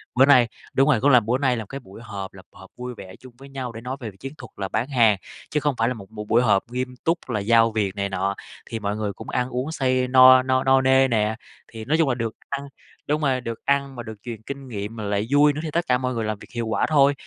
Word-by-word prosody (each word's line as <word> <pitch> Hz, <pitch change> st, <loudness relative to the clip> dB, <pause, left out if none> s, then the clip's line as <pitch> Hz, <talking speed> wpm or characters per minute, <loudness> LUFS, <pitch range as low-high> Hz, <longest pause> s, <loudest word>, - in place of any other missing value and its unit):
bữa 130 Hz, +2 st, +6 dB
nay 130 Hz, -4 st, +6 dB, 0.3 s
đúng 135 Hz, +2 st, +3 dB
rồi, 120 Hz, -7 st, +3 dB
cũng 145 Hz, -, +4 dB
là 125 Hz, -3 st, +7 dB
bữa 115 Hz, +3 st, 0 dB
nay 130 Hz, -3 st, +1 dB
là 110 Hz, -, -5 dB
cái 135 Hz, -, -6 dB
buổi 105 Hz, -3 st, -14 dB
họp, 100 Hz, -4 st, -7 dB
là 95 Hz, -, -12 dB
họp 95 Hz, -1 st, -15 dB
vui 125 Hz, 0 st, -6 dB
vẻ 95 Hz, -1 st, -10 dB
chung 130 Hz, -2 st, -14 dB
với 135 Hz, +1 st, -13 dB
nhau 130 Hz, -3 st, -5 dB
để 115 Hz, -, -9 dB
nói 130 Hz, +3 st, -5 dB
về 115 Hz, -5 st, -6 dB
chiến 135 Hz, +6 st, -7 dB
thuật 125 Hz, -2 st, -11 dB
là 100 Hz, -, -3 dB
bán 110 Hz, +6 st, -1 dB
hàng, 115 Hz, -7 st, +4 dB, 0.3 s
chứ 150 Hz, -, 0 dB
không 145 Hz, -2 st, 0 dB
phải 115 Hz, -, +2 dB
là 125 Hz, -, 0 dB
một 100 Hz, -5 st, -11 dB
b 110 Hz, -1 st, -12 dB
buổi 115 Hz, +3 st, +4 dB
họp 105 Hz, -5 st, +3 dB
nghiêm 125 Hz, 0 st, -3 dB
túc 165 Hz, -4 st, -1 dB
là 110 Hz, -4 st, -1 dB
giao 115 Hz, +2 st, +4 dB
việc 105 Hz, -3 st, -1 dB
này 100 Hz, 0 st, -2 dB
nọ. 95 Hz, +1 st, -1 dB, 0.3 s
Thì 115 Hz, -, -4 dB
mọi 105 Hz, -1 st, -2 dB
người 105 Hz, -2 st, -2 dB
cũng -, -, -10 dB
ăn 125 Hz, +1 st, -1 dB
uống 130 Hz, +5 st, -3 dB
say 130 Hz, -4 st, +1 dB
no 130 Hz, 0 st, +8 dB
no 130 Hz, 0 st, +1 dB
no 135 Hz, 0 st, +4 dB
nê 130 Hz, 0 st, +4 dB
nè, 110 Hz, -2 st, +1 dB, 0.4 s
thì 110 Hz, -1 st, -8 dB
nói 155 Hz, +4 st, +2 dB
chung 165 Hz, -4 st, +2 dB
là 125 Hz, -, +1 dB
được 115 Hz, -2 st, -3 dB
ăn 140 Hz, 0 st, -4 dB, 0.4 s
đúng 150 Hz, +1 st, 0 dB
rồi, 130 Hz, -3 st, +1 dB
được 115 Hz, -2 st, -7 dB
ăn 140 Hz, -1 st, 0 dB
mà 120 Hz, -, -6 dB
được 110 Hz, -1 st, -8 dB
truyền 115 Hz, -3 st, -7 dB
kinh 135 Hz, +3 st, -8 dB
nghiệm 105 Hz, -1 st, -5 dB
mà 110 Hz, -, -6 dB
lại 100 Hz, +1 st, -1 dB
vui 145 Hz, +1 st, +5 dB
nữa 145 Hz, -, -5 dB
thì 155 Hz, -, -4 dB
tất 170 Hz, +2 st, 0 dB
cả 125 Hz, -, +3 dB
mọi 125 Hz, 0 st, -2 dB
người 115 Hz, -, -2 dB
làm 110 Hz, -1 st, -3 dB
việc -, -, -13 dB
hiệu 115 Hz, -1 st, -2 dB
quả 110 Hz, -, +1 dB
thôi. 145 Hz, -2 st, +5 dB
125 Hz, 290 wpm, -23 LUFS, 110-135 Hz, 0.4 s, no